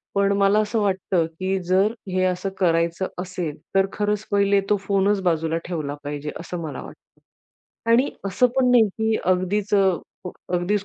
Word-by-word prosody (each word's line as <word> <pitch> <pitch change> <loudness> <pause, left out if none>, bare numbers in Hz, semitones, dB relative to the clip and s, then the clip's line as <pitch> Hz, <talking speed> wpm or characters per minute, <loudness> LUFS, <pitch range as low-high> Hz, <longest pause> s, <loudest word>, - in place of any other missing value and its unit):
पण 200 0 +3
मला 200 +1 +4
असं 215 +1 0
वाटतं, 190 -3 +1
की 190 +1 0
जर 190 +4 +2 0.2
हे 185 0 0
असं 185 +1 -1
करायचं 170 +1 +1
असेल, 180 -5 -4 0.2
तर 195 0 +5
खरंच 210 0 -1
पहिले 200 0 +3
तो 210 - +3
फोनच 200 0 +2
बाजूला 165 -1 +1
ठेवला 155 -5 -3
पाहिजे, 145 +1 -4
असं 175 0 -6
मला 150 -4 -5
वाटतं - - -15 0.7
आणि 245 +4 +4 0.2
असं 195 +6 +3
पण 250 -1 +4
नाही, 230 -3 +5
की 220 +2 -1
अगदीच 185 +3 +1
अ, 190 -3 +4 0.6
अगदीच 190 +3 0
190 Hz, 160 wpm, -23 LUFS, 175-205 Hz, 0.7 s, तर